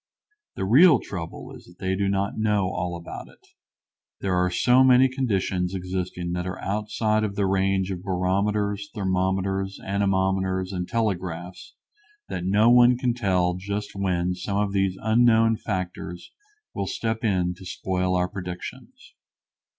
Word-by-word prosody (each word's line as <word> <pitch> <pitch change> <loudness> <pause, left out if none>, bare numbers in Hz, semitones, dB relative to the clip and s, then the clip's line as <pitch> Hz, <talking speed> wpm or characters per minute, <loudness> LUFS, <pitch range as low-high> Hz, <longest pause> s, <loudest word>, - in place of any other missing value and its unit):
The 95 - -2
real 140 - +7
trouble 85 -4 -7
is - - -14
that 90 - -18
they 95 0 -1
do 100 0 0
not 100 0 -1
know 105 -3 +1
all 90 -1 -3
about 85 - -8
it. - - -21 0.7
There 95 -1 -1
are 90 0 +2
so 125 +9 +4
many 130 0 +6
conditions 95 -8 -1
existing 90 -1 -4
that 90 +1 -3
are 90 - -5
outside 105 +1 -1
of 100 -2 -2
the 100 - +1
range 95 0 +1
of 90 -2 -5
barometers, 100 +2 -1
thermometers, 95 0 -1
anemometers, 95 -1 0
and 90 -1 -3
telegraphs 90 -5 -3 0.5
that 90 - -4
no 105 +5 +4
one 125 0 +6
can 125 -1 0
tell 95 -6 +1
just 100 +3 -4
when 90 -2 0
some 95 +2 -3
of 100 -1 0
these 95 -1 +1
unknown 115 0 +4
factors 90 -3 -5 0.4
will 100 - -3
step 110 +2 -3
in 90 -5 +1
to 90 - -14
spoil 90 0 -1
our 90 0 +1
predictions. 90 -2 -8
95 Hz, 150 wpm, -25 LUFS, 90-105 Hz, 0.7 s, real